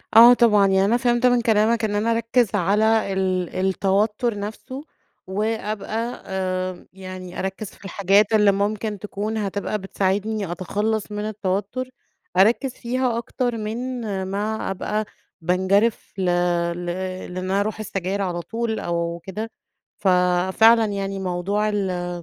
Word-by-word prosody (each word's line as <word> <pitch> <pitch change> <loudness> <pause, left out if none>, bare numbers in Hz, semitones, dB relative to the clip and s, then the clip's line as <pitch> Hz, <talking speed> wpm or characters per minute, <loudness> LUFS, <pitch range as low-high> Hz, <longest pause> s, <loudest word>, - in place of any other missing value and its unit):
آه 235 +2 +10
طبعًا، 210 -5 +5
يعني 195 0 +3
أنا 235 +4 +3
فهمت 240 0 +1
من 245 -1 +4
كلامك 225 0 +2
إن 205 -1 -1
أنا 225 +3 +1
أركِّز 230 -1 +1
على 210 +2 +2
ال 185 -2 0
التوتّر 205 +4 +1
نفسه 255 +7 -6 0.4
وأبقى 215 +3 -3
آمم، 185 -1 -3
يعني 185 -1 -8
اركِّز 190 +2 -4
في - - -17
الحاجات 200 +2 +3
اللي 210 -2 +5
ممكن 205 +1 -1
تكون 210 +1 -4
هتبقى 205 +1 -2
بتساعدني 195 +1 -1
أتخلَّص 210 +5 -2
من 210 0 -3
التوتُّر، 210 +4 -2 0.5
اركِّز 240 +6 +4
فيها 245 0 -1
اكتر 240 0 -2
من 215 +1 -3 0.5
ما 205 +2 -2
ابقى 210 +3 -2 0.4
بانجرف 190 +6 +1
ل 190 - -1 0.5
ل 175 0 -6 0.5
لإن - - -6
أنا 190 +2 0
أروح 215 +1 -2
للسجاير 195 -1 -3
على 175 -2 -2
طول 225 +5 -3
أو 170 0 -2
كده، 215 +4 -5 0.5
ف - - -2 0.5
فعلًا 225 0 +7
يعني 195 -1 -3
موضوع 190 +3 -1
ال 185 -4 -1
205 Hz, 135 wpm, -23 LUFS, 190-220 Hz, 0.5 s, آه